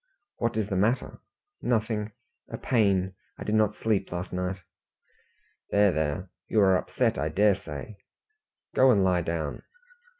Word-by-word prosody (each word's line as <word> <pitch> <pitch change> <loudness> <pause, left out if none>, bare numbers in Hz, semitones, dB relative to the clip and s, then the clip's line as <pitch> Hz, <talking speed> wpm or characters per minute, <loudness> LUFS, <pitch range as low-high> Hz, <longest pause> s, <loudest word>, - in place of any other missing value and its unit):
"What 115 -1 -1
is 110 -2 0
the 100 - -2
matter?" 110 +7 0 0.4
"Nothing 110 -2 0 0.4
a - - -5
pain. 100 -5 +1 0.2
I - - -6
did 105 - -2
not 110 -1 +3
sleep 110 -3 0
last 90 +1 -5
night." 90 +1 -2 1.1
"There, 100 -1 +4
there; 80 +3 -2 0.2
you 110 - +2
are 95 -1 +5
upset, 90 - 0
I 75 +3 0
dare 100 +6 +4
say. 85 +4 -8 0.8
Go 130 - +5
and 105 -6 +4
lie 90 -2 +3
down." 80 -3 -3
100 Hz, 145 wpm, -27 LUFS, 90-110 Hz, 1.1 s, are